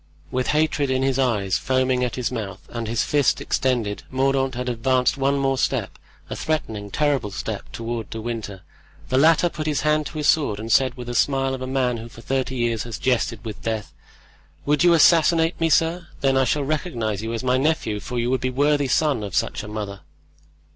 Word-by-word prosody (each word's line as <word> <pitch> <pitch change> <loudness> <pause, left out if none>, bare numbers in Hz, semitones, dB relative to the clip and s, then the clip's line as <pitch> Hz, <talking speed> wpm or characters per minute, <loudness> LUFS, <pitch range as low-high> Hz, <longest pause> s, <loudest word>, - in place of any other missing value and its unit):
With 130 0 -1
hatred 150 -2 +1
in 130 0 +1
his 135 0 +1
eyes, 105 -8 +1
foaming 130 -1 +1
at 125 - -2
his 125 -2 -2
mouth, 105 -6 -6
and 115 -2 -4
his 115 +1 0
fist 145 -4 +2
extended, 120 -6 -1
Mordaunt 135 0 +1
had 125 +1 -4
advanced 125 +1 +1
one 140 0 +1
more 135 -1 0
step, - - -1 0.3
a - - -5
threatening, 110 -10 -3
terrible 140 -4 0
step, 95 - -5
toward 115 -1 -4
De 110 - -6
Winter. 110 -4 -5 0.5
The 130 - +3
latter 165 +3 +5
put 155 -2 -5
his 150 -2 0
hand 150 -1 +1
to 155 - -9
his 150 - 0
sword, 140 -10 +2
and 110 +1 -5
said, 130 0 +3
with 125 -2 -7
the 120 - -5
smile 135 +2 +1
of 130 - -5
a 130 - -4
man 130 -2 0
who 115 +1 -8
for 115 - -13
thirty 130 +1 -2
years 120 -2 0
has 115 -2 -5
jested 120 -2 0
with 110 -2 -6
death: 110 -2 -3 0.7
"Would 150 +3 +2
you 175 -1 +6
assassinate 165 +1 +4
me, 165 - +3
sir? 165 +2 +2
Then 135 -1 +2
I 135 0 +3
shall 145 +4 0
recognize 135 - -2
you 110 +1 -4
as 115 - -4
my 130 0 +2
nephew, 135 -8 0
for 125 +4 -6
you 120 +1 0
would 130 - 0
be 130 - 0
a - - -4
worthy 145 +2 +2
son 140 -2 +1
of 100 -3 -5
such - - 0
a 105 - -8
mother." 105 -2 -5
130 Hz, 215 wpm, -23 LUFS, 115-145 Hz, 0.7 s, you